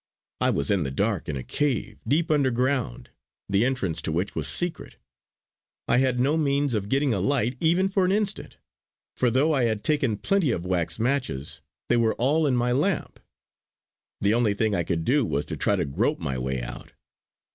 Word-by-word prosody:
I - - +2
was 70 - 0
in 100 -3 +2
the 70 - -2
dark, 100 +6 -1
in 75 - -2
a 65 - -5
cave, 110 - -2
deep 155 +3 +1
underground, 130 - 0 0.4
the 100 +2 +2
entrance 125 -10 -1
to - - -2
which 90 +5 -2
was - - -2
secret; 175 -1 -1 0.9
I 120 - +3
had 130 -2 +1
no 140 +5 +2
means 140 -3 +1
of 105 -2 -2
getting 135 0 +2
a 100 - 0
light 125 +3 0
even 175 +4 +2
for 195 0 +1
an 185 - +2
instant, 205 0 -1 0.6
for 125 - +2
though 140 +7 +2
I 130 -4 +2
had 110 -2 -1
taken 135 -8 +1
plenty 195 - +1
of 90 -7 -2
wax 90 -3 -1
matches 115 - -2 0.3
they 120 - +3
were 115 -1 +2
all 150 +6 +2
in 130 - +2
my 120 0 +1
lamp. 155 +8 -1 1.0
The 100 +1 +2
only 115 -3 +2
thing 110 0 0
I 85 - +1
could 80 0 -2
do 140 +2 +3
was 75 -9 -1
to - - -5
try - - +2
to - - -1
grope 110 - 0
my 70 -7 -3
way 65 0 -3
out. - - -8
120 Hz, 195 wpm, -25 LUFS, 100-145 Hz, 1.0 s, I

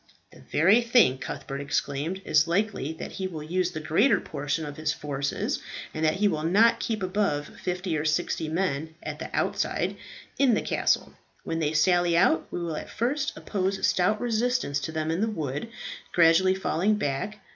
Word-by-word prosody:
"The - - -16
very 195 +9 +4
thing," 235 - +4
Cuthbert 135 +1 -5
exclaimed. 145 +6 -2
"It - - -9
is 155 +1 +5
likely 190 -4 0
that 160 - -7
he 190 - -3
will 160 -5 -7
use 180 +3 0
the 165 -3 -5
greater 195 - +3
portion 145 +2 -3
of 145 -1 -7
his 155 0 0
forces, 140 -2 -2 0.3
and 155 - -3
that 155 0 +3
he 205 +2 +2
will 160 -6 -1
not 200 +9 +4
keep 220 -4 -2
above 185 -6 0
fifty 180 -1 -2
or 150 - -1
sixty 160 0 0
men, 160 -2 -2
at 150 0 -5
the - - -5
outside, - - -1 0.4
in 265 -5 +5
the - - -1
castle. - - 0 0.3
When 165 - -2
they 155 -1 0
sally 175 +2 +3
out 160 -2 +3
we - - -4
will 165 -3 -3
at - - -7
first 270 +5 -1
oppose 195 -1 -1
a - - -12
stout 210 +4 +2
resistance 240 - 0
to 150 - -4
them 155 0 -2
in 165 +4 -1
the 220 - +2
wood, 150 - -3 0.5
gradually 175 +3 +5
falling 190 +2 +1
back. 200 +3 -2
170 Hz, 190 wpm, -27 LUFS, 155-200 Hz, 0.5 s, is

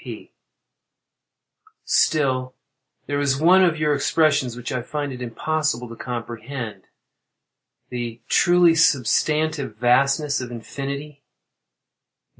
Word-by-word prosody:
P. - - -10 1.5
Still, 130 -4 +1 0.5
there 145 0 -2
is 140 -2 +1
one 185 +4 +6
of 170 -3 +2
your 150 -1 +1
expressions 140 -3 +1
which 125 +2 -6
I 125 -2 -2
find 145 +2 -4
it 125 - -9
impossible 125 +1 -2
to 115 - -9
comprehend—"the 115 -2 -6 1.5
truly 175 -1 +4
substantive 150 -2 +1
vastness 140 +5 +2
of 125 - -6
infinity." 140 +4 -7
140 Hz, 95 wpm, -22 LUFS, 125-155 Hz, 1.5 s, one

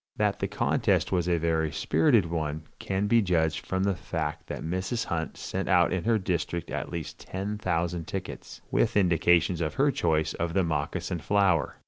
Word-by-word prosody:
That - - +1
the - - 0
contest - - +1
was 90 -2 +1
a 85 - +3
very 80 -1 0
spirited 85 - +3
one 80 -2 -3 0.2
can 95 +1 -1
be 115 +3 +4
judged 80 -5 +1
from 95 0 0
the 100 0 +2
fact 85 - -4
that - - -5
Mrs. 95 +8 -2
Hunt 80 -3 -3
sent 95 +1 -4
out 90 -2 +4
in 95 0 -2
her 115 -1 +3
district 85 -3 -2
at - - -3
least 85 -3 -6
ten 100 +3 -4
thousand 85 -3 -1
tickets, - - -6
with - - +2
indications 85 -2 +3
of 75 -2 -2
her 140 +1 +3
choice 80 - +1
of 85 0 -3
the 95 - +3
moccasin 85 +3 -2
flower. 95 -5 +2
85 Hz, 180 wpm, -28 LUFS, 80-95 Hz, 0.2 s, be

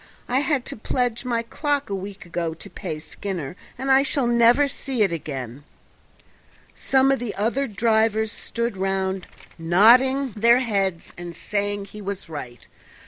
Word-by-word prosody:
I 255 +2 +2
had 280 -2 0
to - - -5
pledge 245 +1 -1
my 235 -2 0
clock 285 +4 -1
a - - 0
week 195 0 -7
ago 170 -2 -3
to - - -9
pay 155 - -5
Skinner, 175 -1 -6 0.2
and 265 +2 -1
I 265 0 +7
shall 275 -1 0
never 235 +4 +5
see 265 -4 -1
it 195 - +1
again." 135 -4 -6 1.1
Some 270 0 +2
of 270 - +1
the 235 -3 -4
other 240 +7 0
drivers 220 0 +1
stood 235 0 -3
round 190 -1 -1 0.3
nodding 245 +10 +5
their 235 +3 +5
heads 195 -8 -1
and 175 -1 -7
saying 205 +2 -2
he 210 +1 -10
was 195 -2 -5
right. 125 -6 -8
215 Hz, 155 wpm, -23 LUFS, 190-250 Hz, 1.1 s, I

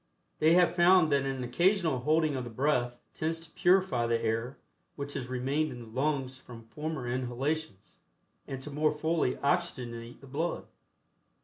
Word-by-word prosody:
They 160 +2 +5
have 180 0 +5
found 175 -2 +5
that 140 -1 +2
an 135 -1 -3
occasional 170 +3 +2
holding 155 +2 +2
of 130 - -2
the 120 - -6
breath 125 0 0 0.2
tends 165 +1 -2
to 165 0 -12
purify 180 -11 +3
the 115 0 +1
air 115 +3 -2 0.4
which 140 0 -5
has 130 -3 -4
remained 135 +5 -1
in 120 - -8
the 115 -2 -10
lungs 135 -3 -1
from 115 -3 -12
former 150 +1 -4
inhalations, 130 -1 -3 0.5
and 135 - -5
to 150 - -7
more 150 +1 +1
fully 160 -3 0
oxygenate 125 -7 -2
the - - -14
blood. 150 +6 -3
140 Hz, 165 wpm, -30 LUFS, 125-160 Hz, 0.5 s, They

